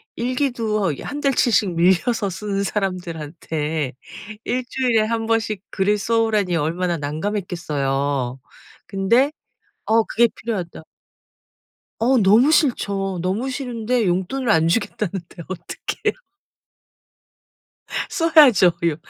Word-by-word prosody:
일기도 235 - 0
이 140 - -7
1 290 0 -5
달치씩 230 -8 +2
밀려서 190 +5 +2
쓰는 200 +1 -3
사람들한테 160 - -3 0.5
1 250 +1 -1
주일에 245 -4 +2
1 225 0 -1
번씩 220 -3 0
글을 205 +2 +1
써 225 +2 +1
오라니 205 -6 +1
얼마나 170 +2 -1
난감했겠어요. 145 -6 -2 0.5
근데 230 +9 +2 0.6
어 225 +1 +4
그게 235 +1 +3
필요하다 185 -8 -5 1.2
어 250 +3 +3
너무 220 +8 +5
싫죠. 200 - +1
너무 205 +8 -1
싫은데 245 -4 -1
용돈을 190 +8 -1
안 160 -2 +4
주겠다는데 185 -3 -2
어떡해요? 185 -2 -4 2.0
써야죠. 305 - +6 0.2
요 155 -3 +1
200 Hz, 230 characters per minute, -21 LUFS, 170-235 Hz, 2.0 s, 써야죠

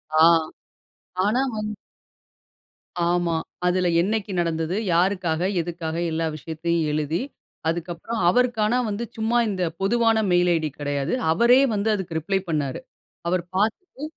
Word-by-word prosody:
ஆ. 155 - +5 1.0
ஆனா 225 +6 +2
வந் 215 0 -3 1.4
ஆமா. 175 -1 +1 0.3
அதுல 180 0 +2
என்னைக்கு 205 +1 -1
நடந்தது? 165 +1 -1 0.2
யாருக்கா? 180 -1 +2 0.3
எதுக்காக? 165 -1 -4 0.2
எல்லா 165 0 0
விஷயத்தையும் 165 +2 -2
எழுதி 155 +5 -1 0.5
அதுக்கப்பறம் 175 +6 -3
அவருக்கான 240 -1 +2 0.2
வந்து 205 +3 -3
சும்மா 225 +2 +1
இந்த 185 -2 -2 0.2
பொதுவான 225 +2 +3
மெயில் 175 0 +4
ஐடி 155 -2 -1
கிடையாது. 145 - -2 0.2
அவரே 235 +9 +5
வந்து 205 +2 0
அதற்கு 175 -4 -4
ரிப்ளை 190 +5 0
பண்ணுனாரு. 145 -5 -1 0.5
அவரு 175 -1 +1
பாத்துட்டு 225 - -1
180 Hz, 120 wpm, -24 LUFS, 165-215 Hz, 1.4 s, ஆ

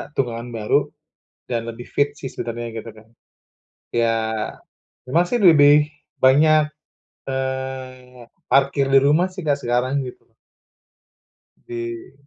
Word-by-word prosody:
tunggangan 120 -2 -2
baru 125 +7 +1 0.6
dan 115 -2 -3
lebih 115 +1 -7
fit 145 0 +1
sih 135 -3 -7
sebenarnya 115 -1 -5
gitu 115 - -11
Kak. 110 0 -14 0.9
Ya 115 -1 +2 0.9
memang 165 +7 +2
sih 245 - +1
lebih 150 -6 +6 0.3
banyak, 155 +4 +5 0.7
eee, 130 -1 -5 0.2
parkir 140 0 +2
di - - +8
rumah 155 +6 +3
sih 185 -1 -7
Kak, 145 -1 +1
sekarang 125 +3 0
gitu. 125 - -11 1.4
Di 115 -1 -6
130 Hz, 115 wpm, -21 LUFS, 120-145 Hz, 1.4 s, di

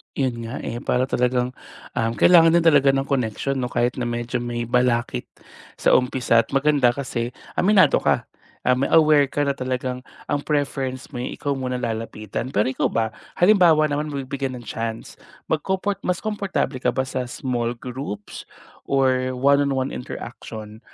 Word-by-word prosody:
Yun 120 -4 -1
nga, 120 +5 -5
eh, 120 - -4
para 125 +2 0
talagang, 125 0 0 0.4
ah, 115 0 +1
kailangan 165 +1 +6
din 170 - +5
talaga 145 -4 +5
ng 135 - +1
connection 135 +1 -1
no 130 - -1
kahit 125 0 0
na 125 - -2
medyo 120 +1 -2
may 120 0 -3
balakit 120 - 0 0.5
sa - - +1
umpisa 125 -2 +1
at - - -14
maganda 135 -3 +3
kasi 120 -3 -3 0.2
aminado 200 0 +5
ka, - - +1 0.4
um 125 +2 +2
aware 155 -3 +6
ka 145 - -2
na 140 -1 -1
talagang 130 0 -3 0.2
ang 145 - +2
preference 135 -3 -2
mo 125 - -7
eh 125 - -4
ikaw 140 -1 -2
muna 125 -1 -3
lalapitan. 115 0 -4
Pero 105 +5 +2
ikaw - - 0
ba 110 -1 +1 0.3
halimbawa 175 -6 +5
naman 150 +1 -1
mabibigyan 135 -1 -3
ng 120 - -8
chance 115 0 -5 0.3
magkoport 190 +5 0
mas 180 -1 0
komportable 200 -9 -2
ka - - -1
ba 130 - +1
sa 130 -1 -3
small 120 -2 -2
groups 120 -4 -7 0.4
or 130 -1 +2
one 140 +2 +4
on 140 - 0
one 130 0 -1
interaction 110 -3 -8
130 Hz, 165 wpm, -23 LUFS, 120-140 Hz, 0.5 s, kailangan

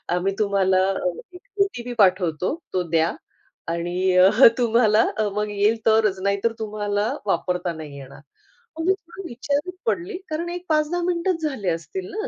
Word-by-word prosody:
आम्ही 195 +2 0
तुम्हाला 195 -2 +2 0.5
1 360 - -12 0.2
ओ-टी-पी 245 -10 -5
पाठवतो 185 - +2 0.2
तो 180 -1 +1
द्या 165 0 +2 0.6
आणि 175 +2 0
अ, 185 +1 +7 0.3
तुम्हाला 230 -2 +4 0.3
मग 210 0 -1
येईल 205 +3 +2
तरच 220 -3 +3
नाहीतर 200 +3 +1
तुम्हाला 210 0 -2
वापरता 180 -3 -1
नाही 150 -3 -9
येणार. 135 0 -12 0.6
मग 325 - -2
मी 380 - +5
थोडी 375 -1 -10
विचारात 285 +8 -2
पडली 370 -3 -1
कारण 335 +3 -3
एक 355 +1 -6
5-10 310 +3 +1
मिनिटं 350 0 0
झाले 210 -9 -3
असतील 370 - -4
ना 435 +4 -3
215 Hz, 145 wpm, -23 LUFS, -, 0.6 s, अ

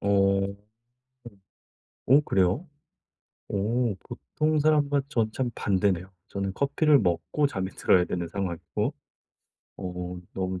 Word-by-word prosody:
어 100 - -1 0.3
어. - - +1 1.6
어 135 +4 +7
그래요? 95 - +2 0.8
오 110 +2 0
보통 155 - -1
사람과 145 -2 +3
전 110 -6 0
참 130 -2 -1
반대네요. 95 -2 0 0.2
저는 100 -1 -3
커피를 140 +2 +3
먹고 90 - +1
잠이 95 -7 -3
들어야 90 -1 +3
되는 85 -1 -3
상황이고 90 -2 -3 0.9
어 90 -1 -5 0.2
너무 95 -1 -2
100 Hz, 220 characters per minute, -27 LUFS, 90-140 Hz, 1.6 s, 어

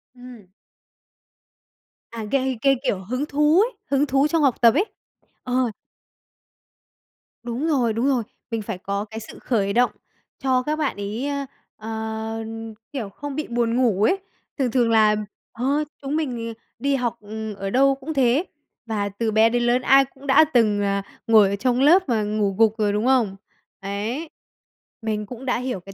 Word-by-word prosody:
Ừm. 245 -6 -13 1.6
À, 230 -1 -5
gây 265 -2 +1
gây, 275 +1 +4
kiểu, 195 -8 -1
hứng 255 +8 -2
thú 300 +3 +3
ấy, 455 0 -1
hứng 280 +1 +3
thú 275 +1 +2
trong 330 +1 +1
học 270 -4 +3
tập 230 -2 +7
ấy. 360 - +2 0.6
Ờ. 250 -1 +1 1.7
Đúng 240 +6 -2
rồi, 250 -8 +2
đúng 230 +5 0
rồi. 260 -4 +2 0.3
Mình 225 -1 -1
phải 200 - -5
có 200 +2 -3
cái 220 +1 -7
sự 225 - -11
khởi 200 -5 0
động 245 +2 +3 0.5
cho 260 -2 +1
các 300 +3 -1
bạn 305 - -1
ấy, 205 +6 -4
ơ, 280 -1 -2 0.3
ờ, 220 0 -4 0.5
kiểu, 245 -8 -4
không 280 +8 -7
bị 305 +1 -3
buồn 235 -1 0
ngủ 230 -6 +2
ấy. 375 - +3 0.4
Thường 260 -4 0
thường 240 -2 +2
là 215 -1 +5 0.4
ờ, 240 +2 -4 0.4
chúng 280 +1 -3
mình, 290 -6 -1
ừ, 230 - -5 0.3
đi 280 0 +1
học, 240 -3 -1
ừ, 215 +1 -6
ở 195 0 -4
đâu 270 +5 +4
cũng 275 +4 -6
thế, 270 +4 +2 0.4
và 210 -3 -2
từ 220 +3 -2
bé 220 +1 +5
đến 240 +1 0
lớn 240 +1 +2
ai 270 +1 +5
cũng 270 +1 -15
đã 270 +3 +7
từng, 215 -4 +3
à, 200 0 0 0.2
ngồi 215 -3 +6
ở 200 - -1
trong 245 +4 0
lớp 335 +4 +5
mà 225 -3 +2
ngủ 205 -2 0
gục 220 -1 +4
rồi, 210 -2 +1
đúng 210 +3 0
không? 245 -7 +3 0.5
Đấy, 215 +11 -4 0.7
mình 215 -1 -2
cũng 250 +4 -9
đã 250 - +1
hiểu 250 -5 -3
cái 195 +2 -12
240 Hz, 180 wpm, -23 LUFS, 215-270 Hz, 1.7 s, tập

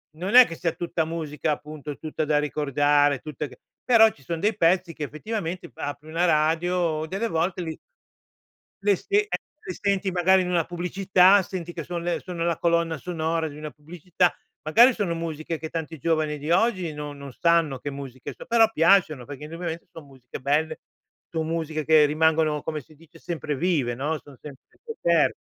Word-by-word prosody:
non 185 +7 -2
è 255 0 +11
che 165 - -7
sia 165 0 -1
tutta 170 0 -2
musica, 155 -1 -3
appunto 150 -1 -6
tutta 155 0 -3
da 150 -1 +2
ricordare, 145 -1 +2
tutta 150 0 -5
che 125 -2 -16 0.2
però 225 -2 +6
ci 140 - -21
son 165 +5 -4
dei 210 +4 +1
pezzi 175 -1 +2
che 155 - -6
effettivamente 175 +2 -5
p - - -34
apri 145 0 -5
una 165 +2 0
radio 160 0 +1
delle 195 +7 -2
volte 175 0 -1
li 160 -2 -5 1.1
li 200 -1 +3
si 405 - 0
e 420 - -6 0.4
li 370 - -3
senti 200 -1 0
magari 185 +1 +4
in 180 - -3
una 170 -2 +2
pubblicità, 185 +3 +3
senti 175 -2 -6
che 165 -2 -6
son 175 +1 -4
le 175 0 -1
sono 175 -2 -4
la 170 -2 0
colonna 170 -1 +1
sonora 165 -1 -2
di 145 - -11
una 150 0 -6
pubblicità. 170 +4 -1 0.3
Magari 235 - +6
sono 195 -6 -1
musiche 165 -1 -4
che 160 - -6
tanti 160 -1 -5
giovani 155 0 0
di 150 +3 -5
oggi 185 -3 +2
non 150 -1 -7
non 140 -1 -9
sanno 165 -2 +2
che 145 - -5
musiche 135 -2 -8
so - - -10
però 230 -2 +5
piacciono 165 - +3
perché 145 +3 -9
indubbiamente 165 +1 -6
son 165 - -11
musiche 130 -3 -10
belle, 155 +4 0 0.5
son 160 -1 -2
musiche 160 -1 -2
che 155 -1 +6
rimangono, 155 0 +2
come 155 -1 -4
si 155 - -20
dice, 165 +2 -19
sempre 160 -4 -4
vive, 145 -7 0
no, 150 +6 -2
son 145 -2 -15
sempre 140 -3 -11 0.2
scoper 170 - +1
160 Hz, 190 wpm, -25 LUFS, 150-175 Hz, 1.1 s, è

